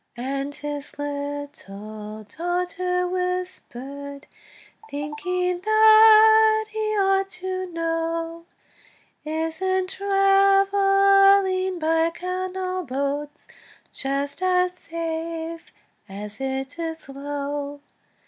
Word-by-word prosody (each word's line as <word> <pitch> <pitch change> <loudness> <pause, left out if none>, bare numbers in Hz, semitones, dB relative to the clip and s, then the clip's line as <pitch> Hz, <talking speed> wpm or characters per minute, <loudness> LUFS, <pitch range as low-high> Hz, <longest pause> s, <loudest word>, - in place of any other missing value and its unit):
And 275 +3 -3
his 290 -1 -7
little 280 -8 -6
daughter 360 - -2
whispered, 285 -7 -5 0.6
Thinking 350 +5 -2
that 435 0 +7
he 430 -1 -1
ought 390 0 +2
to 370 0 -4
know, 330 0 -3 0.8
"Isn't 325 +4 -1
travelling 390 -1 +4
by 325 0 +2
canal 370 +1 -4
boats 280 +2 -4 0.5
Just 280 +3 -3
as 365 -1 +2
safe 330 0 -5 0.4
as 205 +2 -8
it 265 +3 -3
is 325 -1 -3
slow?" 285 0 -5
335 Hz, 75 wpm, -24 LUFS, 285-375 Hz, 0.8 s, that